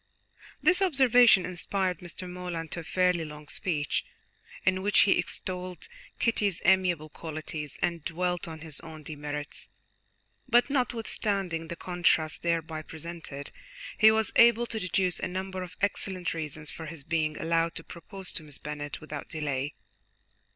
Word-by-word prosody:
This 365 Hz, +1 st, +5 dB
observation 250 Hz, -, +6 dB
inspired 185 Hz, +1 st, -1 dB
Mr. 180 Hz, +1 st, -6 dB
Morland 180 Hz, -2 st, -5 dB
to -, -, -4 dB
a -, -, -6 dB
fairly 180 Hz, 0 st, +2 dB
long 150 Hz, -1 st, -9 dB
speech, 150 Hz, -4 st, 0 dB, 0.6 s
in 185 Hz, 0 st, +3 dB
which 205 Hz, +1 st, +5 dB
he 200 Hz, -, +5 dB
extolled 180 Hz, 0 st, -2 dB, 0.3 s
Kitty's 205 Hz, -6 st, +1 dB
amiable 180 Hz, -5 st, +4 dB
qualities 155 Hz, -1 st, -6 dB
and 170 Hz, -3 st, 0 dB
dwelt 175 Hz, +1 st, -1 dB
on 160 Hz, -1 st, -7 dB
his 155 Hz, -3 st, -6 dB
own 160 Hz, -2 st, -10 dB
demerits, 150 Hz, 0 st, -5 dB, 0.8 s
but 240 Hz, +3 st, +5 dB
notwithstanding 205 Hz, -, -1 dB
the 170 Hz, -, -5 dB
contrast 170 Hz, -3 st, +1 dB
thereby 165 Hz, -2 st, 0 dB
presented, 160 Hz, -3 st, -7 dB, 0.4 s
he 220 Hz, -, +8 dB
was 220 Hz, 0 st, +2 dB
able 235 Hz, 0 st, +7 dB
to 225 Hz, -2 st, -4 dB
deduce 185 Hz, -2 st, +1 dB
a -, -, -1 dB
number 185 Hz, +1 st, -4 dB
of 180 Hz, -1 st, -8 dB
excellent 190 Hz, -2 st, -1 dB
reasons 155 Hz, -2 st, -5 dB
for 160 Hz, -, -7 dB
his 155 Hz, -2 st, -7 dB
being 155 Hz, -1 st, 0 dB
allowed 165 Hz, 0 st, +1 dB
to 165 Hz, -, -7 dB
propose 180 Hz, +3 st, -8 dB
to -, -, -4 dB
Miss 145 Hz, -3 st, -7 dB
Bennet 145 Hz, 0 st, -5 dB
without 155 Hz, -, -6 dB
delay. 145 Hz, -2 st, -2 dB
170 Hz, 145 wpm, -29 LUFS, 155-190 Hz, 0.8 s, he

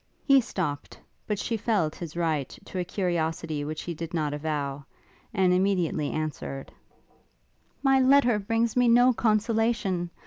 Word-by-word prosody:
He 275 Hz, -2 st, +6 dB
stopt; 170 Hz, -11 st, -4 dB, 0.3 s
but 210 Hz, -, -1 dB
she 230 Hz, +3 st, -2 dB
felt 200 Hz, -8 st, 0 dB
his 170 Hz, -1 st, -8 dB
right 155 Hz, -6 st, 0 dB, 0.2 s
to 185 Hz, -, -5 dB
a -, -, 0 dB
curiosity 165 Hz, -4 st, -2 dB
which 155 Hz, +1 st, -5 dB
he 175 Hz, -, -4 dB
did 165 Hz, +1 st, -6 dB
not 150 Hz, -3 st, -1 dB
avow, 145 Hz, -2 st, -3 dB, 0.5 s
and 190 Hz, -5 st, +3 dB
immediately 180 Hz, -5 st, +1 dB
answered: 150 Hz, -3 st, -4 dB, 1.1 s
'My 270 Hz, -1 st, +4 dB
letter 260 Hz, -4 st, +4 dB
brings 225 Hz, +3 st, 0 dB
me 245 Hz, -1 st, +4 dB
no 245 Hz, +2 st, +6 dB
consolation! 215 Hz, -5 st, +1 dB
180 Hz, 140 wpm, -27 LUFS, 155-225 Hz, 1.1 s, He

